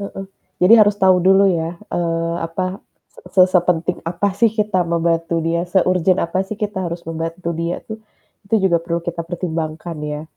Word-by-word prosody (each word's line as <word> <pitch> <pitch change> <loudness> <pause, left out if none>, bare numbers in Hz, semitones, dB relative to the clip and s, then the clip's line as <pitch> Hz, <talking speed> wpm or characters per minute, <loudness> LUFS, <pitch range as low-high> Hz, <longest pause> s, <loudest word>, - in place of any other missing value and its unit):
Heeh, 195 -1 -6 0.4
jadi 185 +5 +7
harus 205 -1 +4
tahu 185 -2 +4
dulu 190 +2 +5
ya, 165 0 -3 0.2
eee, 165 -1 -1
apa 185 +3 -3 0.6
se 185 - +7
sepenting 180 -1 +1
apa 180 +4 0
sih 225 +4 +3
kita 210 -3 -1
membantu 165 0 0
dia, 165 +1 0
seurgen 185 -1 +2
apa 170 +2 -2
sih 215 - -5
kita 210 -2 -3
harus 170 0 -7
membantu 165 +2 -4
dia 170 +1 -2
tuh, 220 0 -8 0.5
itu 225 - +1 0.2
juga 170 - +3
perlu 170 0 -3
kita 170 -1 -4
pertimbangkan 165 -1 -4
ya. 150 0 -4
175 Hz, 170 wpm, -19 LUFS, 165-190 Hz, 0.6 s, jadi